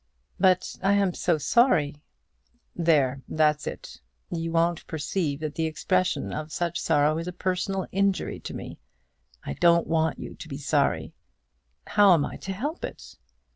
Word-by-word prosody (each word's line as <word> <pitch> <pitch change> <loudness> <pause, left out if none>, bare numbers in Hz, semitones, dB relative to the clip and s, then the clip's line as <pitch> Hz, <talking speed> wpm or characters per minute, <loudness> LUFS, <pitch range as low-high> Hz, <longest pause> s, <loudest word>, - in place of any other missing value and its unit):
"But 185 -1 +2
I 195 +1 +3
am 200 -3 +2
so 170 -2 +1
sorry." 150 - +2 0.7
"There, 145 -6 +2
that's 150 -1 +1
it. - - -7 0.3
You 165 -1 -2
won't 170 0 +1
perceive 155 -1 -2
that 155 -2 -3
the 160 +1 -1
expression 185 +4 0
of 155 0 -5
such 170 0 -2
sorrow 155 0 +2
is 165 - -5
a - - -2
personal 185 +1 -2
injury 195 0 0
to - - -7
me. - - -8 0.7
I - - -3
don't 170 -1 +4
want 160 -1 +1
you - - -7
to - - -10
be 135 -3 -6
sorry." 145 0 0 0.7
"How 200 -3 +6
am 145 - +1
I - - -6
to 195 - -6
help 285 - -4
it?" - - -7
165 Hz, 160 wpm, -26 LUFS, 155-185 Hz, 0.7 s, How